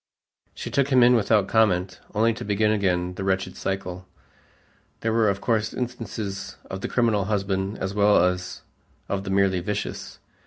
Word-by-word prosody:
She -, -, -6 dB
took 140 Hz, -1 st, +2 dB
him 130 Hz, -3 st, +5 dB
in 125 Hz, +1 st, +6 dB
without 110 Hz, -3 st, +3 dB
comment, 95 Hz, -5 st, +2 dB, 0.2 s
only 115 Hz, +2 st, +3 dB
to -, -, -7 dB
begin 105 Hz, +1 st, +1 dB
again 90 Hz, -4 st, 0 dB
the 95 Hz, -, -5 dB
wretched 95 Hz, -1 st, -1 dB
cycle. 90 Hz, -1 st, -4 dB, 0.9 s
There 110 Hz, 0 st, 0 dB
were 110 Hz, -2 st, +3 dB
of 100 Hz, 0 st, -2 dB
course 110 Hz, -2 st, 0 dB
instances 110 Hz, -5 st, -5 dB
of 95 Hz, 0 st, -5 dB
the -, -, -2 dB
criminal 115 Hz, -5 st, +2 dB
husband 100 Hz, -1 st, -1 dB
as 95 Hz, +1 st, -3 dB
well 100 Hz, -3 st, +4 dB
as 90 Hz, 0 st, -3 dB, 0.4 s
of 100 Hz, 0 st, -3 dB
the -, -, -4 dB
merely 95 Hz, -1 st, +2 dB
vicious. 105 Hz, +3 st, -4 dB
100 Hz, 165 wpm, -24 LUFS, 95-110 Hz, 0.9 s, in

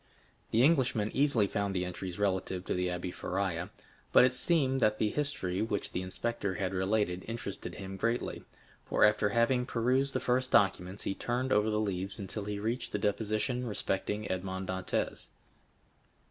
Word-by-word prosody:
The 115 Hz, +3 st, +3 dB
Englishman 130 Hz, -8 st, +3 dB
easily 135 Hz, -6 st, +3 dB
found 100 Hz, 0 st, -2 dB
the 90 Hz, 0 st, 0 dB
entries 90 Hz, 0 st, -5 dB
relative 95 Hz, -2 st, -1 dB
to -, -, -1 dB
the 90 Hz, 0 st, 0 dB
Abbé 90 Hz, 0 st, -3 dB
Faria; 90 Hz, -2 st, -2 dB, 0.4 s
but -, -, +8 dB
it 130 Hz, 0 st, +4 dB
seemed 135 Hz, -1 st, +3 dB
that 110 Hz, -1 st, +3 dB
the 110 Hz, -, +1 dB
history 120 Hz, -11 st, -2 dB
which 105 Hz, -2 st, -2 dB
the 90 Hz, -, -2 dB
inspector 100 Hz, +1 st, -2 dB
had 95 Hz, -2 st, -2 dB
related 95 Hz, -1 st, 0 dB
interested 100 Hz, -6 st, -5 dB
him 95 Hz, -1 st, -7 dB
greatly, 115 Hz, +5 st, -1 dB, 0.4 s
for -, -, +1 dB
after 105 Hz, 0 st, +4 dB
having 120 Hz, +3 st, +2 dB
perused 130 Hz, +4 st, +1 dB
the -, -, +2 dB
first 130 Hz, +1 st, +1 dB
documents 95 Hz, -1 st, +2 dB
he -, -, -1 dB
turned 125 Hz, +5 st, -1 dB
over 105 Hz, +1 st, +3 dB
the 105 Hz, 0 st, +1 dB
leaves 95 Hz, -2 st, -2 dB
until 100 Hz, +1 st, -5 dB
he 105 Hz, 0 st, -3 dB
reached 115 Hz, +5 st, -2 dB
the -, -, +1 dB
deposition 110 Hz, +4 st, -1 dB
respecting 105 Hz, 0 st, -2 dB
Edmond 95 Hz, 0 st, -3 dB
Dantès. 95 Hz, 0 st, -2 dB
105 Hz, 165 wpm, -31 LUFS, 95-120 Hz, 0.4 s, but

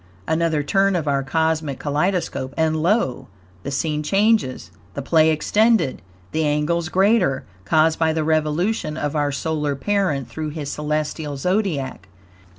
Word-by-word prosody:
Another 160 Hz, -2 st, +1 dB
turn 195 Hz, +5 st, +2 dB
of 160 Hz, -4 st, -2 dB
our 140 Hz, -1 st, +1 dB
cosmic 160 Hz, 0 st, -1 dB
kaleidoscope, 150 Hz, -3 st, -1 dB
and 160 Hz, -1 st, +2 dB
lo! 165 Hz, -, 0 dB, 0.3 s
the 140 Hz, -, -5 dB
scene 150 Hz, +2 st, -1 dB
changes 200 Hz, -, +1 dB, 0.2 s
the 140 Hz, -, -3 dB
play 160 Hz, +2 st, +4 dB
extended, 210 Hz, -, +2 dB, 0.3 s
the 160 Hz, -, 0 dB
angles 155 Hz, +3 st, 0 dB
greater, 190 Hz, -, +2 dB, 0.2 s
caused 155 Hz, +8 st, +3 dB
by 160 Hz, -1 st, +3 dB
the 160 Hz, 0 st, -1 dB
revolution 155 Hz, +3 st, 0 dB
of 145 Hz, 0 st, -2 dB
our 145 Hz, -1 st, +1 dB
solar 150 Hz, 0 st, -2 dB
parent 155 Hz, -, 0 dB
through 155 Hz, +6 st, -5 dB
his 150 Hz, -2 st, -5 dB
celestial 150 Hz, -1 st, -3 dB
Zodiac. 150 Hz, -, -1 dB
155 Hz, 140 wpm, -21 LUFS, 145-175 Hz, 0.3 s, play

